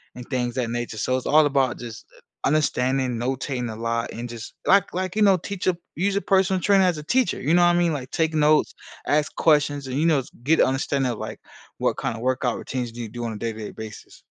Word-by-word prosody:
and 125 -1 -10
things 125 -3 -1
that 125 -3 -1
nature. 120 -2 -4
So, 130 +3 +1
it's 130 - -6
all 155 0 +6
about 135 -3 +1
just 115 -2 -8
u - - -19 0.3
understanding, 130 -4 +1
notating 125 -1 -2
a - - -7
lot, 115 +1 -2
and 120 +1 -5
just, 115 -1 -8
like 195 0 +4
like, 185 0 -2
you 215 - +1
know, 195 -2 +5
teach 195 +2 -5
a 180 -2 +2 0.2
use 195 +4 0
a 200 - 0
personal 190 -1 +2
trainer 195 0 +4
as 175 -3 +1
a - - -8
teacher. 250 +5 +1
You 150 +5 +1
know 175 - +5
what 175 0 +5
I - - +3
mean? 170 -2 +2
Like, 130 -3 -5
take 160 -1 0
notes, 150 0 +3 0.3
ask 150 0 +1
questions, 145 -3 +2
and, 130 +1 -3
you 160 - +2
know, 145 -5 +3 0.2
get 160 +5 +3
an - - +6
understanding 135 -1 0
of, 115 - -6
like, - - -6 0.4
what - - 0
kind - - -2
of 115 - -8
workout 130 -2 0
routines 125 -3 -4
do 120 - -10
you 115 - -5
do 120 +1 -5
on 115 - -3
a - - -6
day-to-day 110 -1 -4
basis. 110 -1 -10
135 Hz, 245 wpm, -24 LUFS, 120-165 Hz, 0.4 s, all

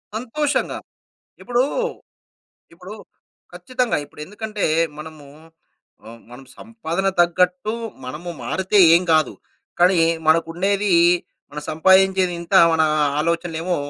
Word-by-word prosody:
సంతోషంగా. 275 +6 -2 0.7
ఇప్పుడూ 245 0 0 1.1
ఇప్పుడు 180 +4 -12 0.6
ఖచ్చితంగా. 255 -2 -2
ఇప్పుడెందుకంటే 210 +8 -7 0.3
మనము 155 -1 -11 0.8
ఆహ్, 115 +1 -12
మనము 125 +2 -13
సంపాదన 195 -5 -4
తగ్గట్టు 180 +7 +1 0.3
మనము 150 +7 -7
మారితే 190 - -1 0.2
ఏం 170 - +3
గాదు. 155 -1 +2 0.5
కానీ 180 0 +4 0.3
మనకుండేది 175 +6 +1 0.6
మనం 150 +1 -7
సంపాయించేది 190 +2 +3
ఇంత. 170 +3 -5 0.2
మన 160 0 +2 0.4
ఆలోచనలేమో 170 +1 -2
180 Hz, 90 wpm, -20 LUFS, 160-205 Hz, 1.1 s, కానీ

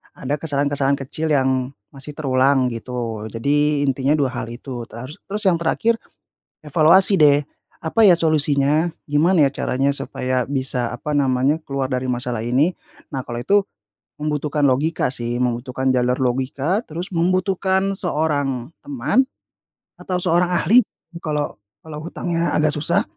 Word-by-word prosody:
ada 140 +2 -3
kesalahan-kesalahan 140 -2 0
kecil 155 +4 -4
yang 130 -2 +1 0.2
masih 145 +1 -10
terulang 130 -2 +2
gitu. 115 -2 -5
Jadi 145 +5 +1
intinya 135 +2 +1
dua 135 -4 0
hal 120 - -5
itu 120 0 -7
teru 125 +4 -9 0.2
terus 210 +2 -2
yang 175 -4 +3
terakhir 225 +7 +1 0.7
evaluasi 170 +6 +5
deh 145 -1 +5 0.4
apa 225 +8 +1
ya 175 - +6
solusinya? 150 0 +2 0.2
Gimana 155 +2 +3
ya 135 - +1
caranya 135 +2 0
supaya 130 -2 -2
bisa 130 -3 -1
apa 135 +5 -5
namanya 140 +2 +1
keluar 140 -2 -3
dari 130 0 -2
masalah 125 -2 -2
ini? 130 +9 +1 0.4
Nah 135 - -2
kalau 120 -1 -6
itu 200 +10 +3 0.6
membutuhkan 150 -1 0
logika 140 0 +1
sih, 120 0 -3
membutuhkan 125 +2 -1
jalur 125 0 +1
logika, 135 - -1
terus 175 -1 -6
membutuhkan 190 +2 +1
seorang 145 - -1
teman 270 -2 +1 0.7
atau 180 -1 -3
seorang 180 0 +2
ahli, 210 +8 +4 0.4
kala 150 -2 -2 0.3
kalau 155 -1 -8
hutangnya 170 0 -2
agak 155 -1 +2
susah, 170 +7 +1
145 Hz, 135 wpm, -21 LUFS, 130-165 Hz, 0.7 s, ya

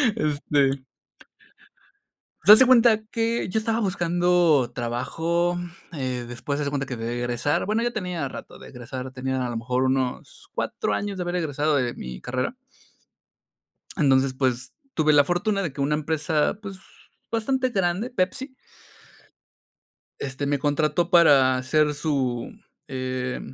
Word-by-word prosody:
Este. 145 - +1 1.6
Pues 205 +6 +10
haz - - +4
de 260 - +7
cuenta 235 -3 +5
que 230 0 0
yo 220 - 0
estaba 225 +1 0
buscando 175 - +2
trabajo, 165 +9 -1 0.3
eh, 130 -6 -3
después 130 +4 -4
haz 150 - -1
de 140 - -2
cuenta 140 -1 -2
que 125 - -5
de 115 +2 -3
egresar, 120 +7 -1
bueno, 220 +2 +1
ya 240 - 0
tenía 180 -7 -3
rato - - -10
de - - -12
egresar, 125 +1 -7
tenía 130 0 -2
a - - -3
lo 115 - -3
mejor 125 +3 -1
unos 130 -1 -2
4 105 - -2
años 200 - -3
de - - -3
haber 175 0 -3
egresado 155 -3 0
de 125 -3 0
mi 65 -1 -8
carrera. 125 - -3 1.4
Entonces, 135 -2 +3
pues 130 -1 -1 0.2
tuve 155 -1 +3
la 145 -1 +7
fortuna 195 +6 0
de 160 -7 -3
que 140 - -5
una 145 +2 +1
empresa, 155 +2 0
pues 195 -2 -8 0.5
bastante 255 +3 0
grande, 195 +1 0
Pepsi. 255 +5 -2 1.7
Este, 135 +1 -3
me 140 0 0
contrató 150 +3 +1
para 140 -7 +5
ser 150 +2 +2
su, 135 -5 -2 0.4
eh, 130 -2 -3
150 Hz, 145 wpm, -24 LUFS, 130-180 Hz, 1.7 s, Pues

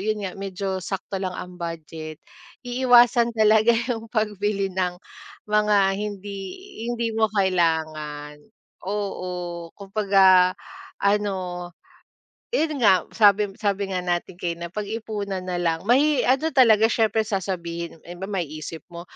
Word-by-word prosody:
yun 210 0 -2
nga, 185 - -4
medyo 195 -1 -4
sakto 195 +1 -4
lang 185 -1 -2
ang 180 0 -9
budget, 160 -2 -6 0.5
iiwasan 245 -1 +4
talaga 220 +1 +5 0.2
yung 225 -2 -3
pagbili 205 -3 -1
ng 180 -1 -1 0.5
mga 210 0 +2 0.2
hindi 205 -1 -5 0.5
hindi 235 -1 -1
mo 220 0 +2
kailangan, 155 -6 -1 0.5
oo. 180 -4 -4
Kumbaga 195 -2 +4 0.4
ano, 190 -4 -1 0.9
yun 310 - 0
nga, 195 -5 +5
sabi 205 -1 +4
sabi 200 -2 -1
nga 185 - -1
natin 175 0 -3
kanina, 170 -1 -4
pag-ipunan 205 -1 -4
na 180 -1 -3
lang. 165 -2 0
May 275 +7 +3
ano 270 +5 +2
talaga, 225 -4 +6
siyempre 220 -1 +1
sasabihin 170 -4 -4
ng - - -30
iba, 175 +2 -7
maiisip 160 -3 -5
mo, 170 -1 -9
195 Hz, 120 wpm, -24 LUFS, 175-215 Hz, 0.9 s, talaga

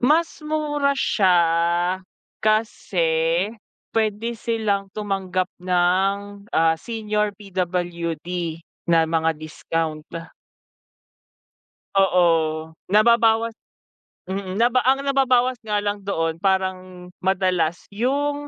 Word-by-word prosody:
Mas 315 +7 +2
mura 295 -2 0
siya 190 -8 +3 1.1
kasi 175 -5 +1 0.4
pwede 220 +1 0
silang 215 -4 -1
tumanggap 190 -3 -2
ng, 190 +3 0
ah, 160 0 +3
senior, 210 -1 -2
PWD 175 -4 -3 0.6
na 165 -1 +5
mga 165 0 +2
discount. 155 0 -3 1.9
Oo, 180 -2 +4 0.6
nababawas 225 +1 +4 0.8
mm 190 -1 -4
naba 240 +4 +3
ang 270 +1 +3
nababawas 255 -3 +2
nga 210 -2 -2
lang 205 0 -1
doon 165 -4 -1
parang 185 -1 -1
madalas 185 -3 0
yung 285 +6 -1
200 Hz, 85 wpm, -22 LUFS, 180-230 Hz, 1.9 s, na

